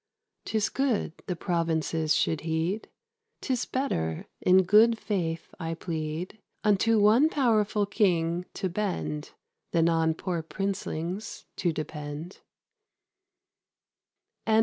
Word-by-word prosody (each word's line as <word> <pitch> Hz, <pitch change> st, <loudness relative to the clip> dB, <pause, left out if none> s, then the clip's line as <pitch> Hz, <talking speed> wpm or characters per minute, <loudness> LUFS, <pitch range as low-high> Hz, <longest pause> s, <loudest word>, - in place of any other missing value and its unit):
'Tis 220 Hz, -1 st, 0 dB
good 260 Hz, -11 st, 0 dB
the 180 Hz, -, -1 dB
provinces 165 Hz, -2 st, 0 dB
should 160 Hz, -, +1 dB
heed: 165 Hz, +6 st, -1 dB, 0.5 s
'Tis 255 Hz, -2 st, -1 dB
better, 80 Hz, -, -2 dB, 0.2 s
in 185 Hz, +1 st, +6 dB
good 220 Hz, +5 st, +6 dB
faith 170 Hz, -7 st, -3 dB
I 165 Hz, -1 st, -3 dB
plead, 165 Hz, +4 st, -4 dB, 0.2 s
Unto 215 Hz, +2 st, +4 dB
one 225 Hz, +9 st, +6 dB
powerful 215 Hz, -7 st, +2 dB
king 180 Hz, -4 st, +1 dB
to 190 Hz, -, -1 dB
bend, 180 Hz, -5 st, -3 dB, 0.4 s
Than 165 Hz, -1 st, +4 dB
on 160 Hz, -1 st, +2 dB
poor 175 Hz, -1 st, -2 dB
princelings 190 Hz, +1 st, -4 dB
to 175 Hz, -, +1 dB
depend. 155 Hz, +2 st, -6 dB
180 Hz, 105 wpm, -28 LUFS, 160-210 Hz, 0.5 s, in